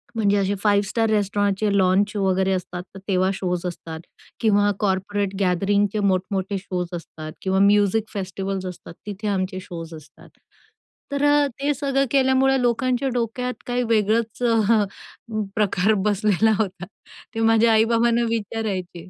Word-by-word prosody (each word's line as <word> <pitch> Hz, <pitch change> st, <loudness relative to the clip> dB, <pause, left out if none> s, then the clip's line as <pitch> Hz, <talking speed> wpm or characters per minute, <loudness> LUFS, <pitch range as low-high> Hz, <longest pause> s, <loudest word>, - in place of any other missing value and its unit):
म्हणजे 205 Hz, -2 st, +2 dB
असे 200 Hz, +1 st, 0 dB
five 205 Hz, -1 st, +3 dB
star 225 Hz, +1 st, 0 dB
रेस्टॉरंटचे 205 Hz, 0 st, +1 dB
launch 195 Hz, +3 st, +2 dB
वगैरे 190 Hz, -1 st, +1 dB
असतात, 180 Hz, -1 st, -4 dB
तर -, -, -8 dB
तेव्हा 185 Hz, -1 st, +2 dB
शोज 180 Hz, -1 st, -3 dB
असतात 165 Hz, -2 st, -6 dB, 0.4 s
किंवा 205 Hz, -2 st, +3 dB
कॉर्पोरेट 200 Hz, 0 st, -1 dB
गॅदरिंगचे 200 Hz, +3 st, +1 dB
मोठमोठे 195 Hz, 0 st, 0 dB
शोज 180 Hz, -2 st, -4 dB
असतात 155 Hz, -2 st, -7 dB
किंवा 190 Hz, 0 st, 0 dB
म्युझिक 205 Hz, +1 st, +4 dB
फेस्टिव्हल्स 195 Hz, -1 st, -4 dB
असतात, 180 Hz, -2 st, -8 dB
तिथे 205 Hz, +1 st, -5 dB
आमचे 185 Hz, -1 st, -1 dB
शोज 170 Hz, -4 st, -8 dB
असतात. 155 Hz, -1 st, -15 dB, 0.8 s
तर 280 Hz, 0 st, -1 dB, 0.4 s
ते 290 Hz, +1 st, +1 dB
सगळं 275 Hz, 0 st, 0 dB
केल्यामुळे 265 Hz, -1 st, +3 dB
लोकांच्या 250 Hz, +2 st, +1 dB
डोक्यात 250 Hz, +1 st, -2 dB
काही 245 Hz, 0 st, 0 dB
वेगळंच 220 Hz, +1 st, +1 dB, 1.2 s
प्रकार 210 Hz, -1 st, +2 dB
बसलेला 210 Hz, +1 st, +2 dB
होता. 190 Hz, -3 st, -2 dB, 0.5 s
ते -, -, -2 dB
माझ्या 225 Hz, 0 st, +4 dB
आई-बाबांना 230 Hz, +1 st, +3 dB
विचारायचे. 195 Hz, -5 st, -4 dB
205 Hz, 130 wpm, -22 LUFS, 190-225 Hz, 1.2 s, म्युझिक